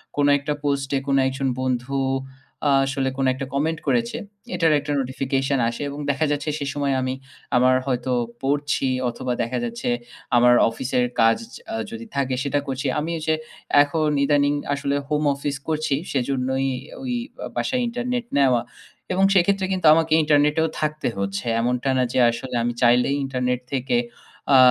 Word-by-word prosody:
কোন 145 0 +2
একটা 145 +1 -2
পোস্টে 140 -1 0
কোন 140 - +2
একজন 135 0 -2
বন্ধু 130 +1 -1 0.7
আ - - +4
আসলে 135 0 -1
কোন 135 - +1
একটা 135 +1 -5
কমেন্ট 155 +3 0
করেছে। 235 -1 +1 0.4
এটার 165 -2 +3
একটা 145 +1 -5
notification 135 +1 -1
আসে 120 - -6
এবং 145 +1 -7
দেখা 140 +3 0
যাচ্ছে 145 +1 -1
সেই 140 0 -3
সময় 140 -1 0
আমি 130 0 -1 0.4
আমার 130 +1 +5
হয়তো 125 0 -1 0.3
পড়ছি 140 -1 0 0.2
অথবা 125 +1 -3
দেখা 125 +2 -3
যাচ্ছে 120 +1 -3 0.5
আমার 120 0 +6 0.2
অফিসের 125 +1 -1 0.2
কাজ 115 0 +5 0.4
আ - - -1 0.2
যদি 230 0 -7
থাকে 135 -2 0
সেটা 145 0 0
করছি 135 +1 -3
আমি 160 +3 -3
এই - - -7
যে 160 - +3 0.5
এখন 155 +1 -1 0.2
ইদানিং 145 0 +3 0.2
আসলে 140 0 -1
হোম 150 0 0
অফিস 140 0 -3
করছি 155 -3 0 0.2
সেজন্যই 130 0 0 0.3
ওই 255 -2 -3 0.3
ও - - -3
বাসায় 255 -1 0
internet 245 0 -2
নেওয়া 130 -4 +4 0.5
এবং 190 +1 +2
সেক্ষেত্রে 190 +1 +3
কিন্তু 185 -4 +1
আমাকে 160 -1 +2
ইন্টারনেটেও 150 +2 +3
থাকতে 155 0 -1
হচ্ছে। 100 +3 -3 0.2
এমনটা 125 +2 0
না 130 - +3
যে - - +2
আসলে 125 +2 -6
আমি 120 0 0
চাইলেই 125 +3 +4
internet 125 -1 -1
থেকে 130 -2 +1 0.6
আ - - +9
140 Hz, 165 wpm, -23 LUFS, 130-150 Hz, 0.7 s, আ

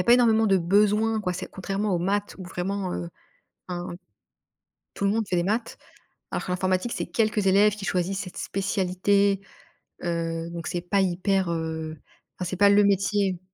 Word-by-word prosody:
a - - 0
pas 240 - +7
énormément 225 -2 +4
de 195 -2 +4
besoins 210 +5 +3
quoi, 180 -3 -1
c'est 180 - -5
contrairement 195 +1 -2
aux - - +1
maths 200 +4 -1
où 185 - -7
vraiment, 185 +1 -3
heu, 170 - -4 0.6
hein, 175 0 -4 1.1
tout 200 - -3
le 200 - +3
monde 225 +1 +1
fait 180 - 0
des 175 - +2
maths. 220 +5 -1 0.5
Alors - - -3
que - - -4
l'informatique, 185 +5 0
c'est - - -3
quelques 215 -3 0
élèves 200 +2 +5
qui 205 - -7
choisissent 190 +1 -1
cette 180 - -7
spécialité, 195 +1 +1 0.6
heu, 165 -1 -2
donc 170 -1 -6
c'est 175 - -2
pas 180 +3 +1
hyper, 190 0 +1
heu, 160 -1 -3 0.4
enfin 180 - -2
c'est 185 - -3
pas 200 +2 +6
le 205 +1 +6
métier. 200 -1 +2
195 Hz, 180 wpm, -26 LUFS, 180-205 Hz, 1.1 s, pas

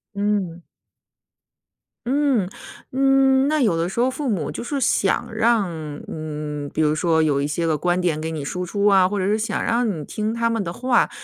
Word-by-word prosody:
嗯。 200 -4 -1 1.4
嗯。 260 -7 +1 0.4
嗯， 270 0 +3
那 305 +1 +1
有 200 -9 +2
的 165 +1 0
时 215 - -4
候 250 - +3
父 285 0 -3
母 185 -9 -1
就 - - -6
是 280 +3 -2
想 - - +1
让， 230 -4 +2 0.4
嗯， 150 -2 -5
比 - - 0
如 150 -1 +3
说 160 +1 +2
有 145 -3 +1
一 145 - 0
些 160 +3 -2
个 160 -2 +1
观 175 +3 0
点 170 -4 0
给 160 +1 -3
你 155 -3 -4
输 180 +5 -3
出 200 +3 -1
啊， 195 -3 +5
或 200 +2 -2
者 185 - 0
是 210 +2 +2
想 220 - -2
让 235 0 +1
你 165 -7 -4
听 215 +6 -3
他 230 0 0
们 225 -2 -1
的 170 - -4
话。 250 +3 +2
195 Hz, 215 characters per minute, -22 LUFS, 160-235 Hz, 1.4 s, 啊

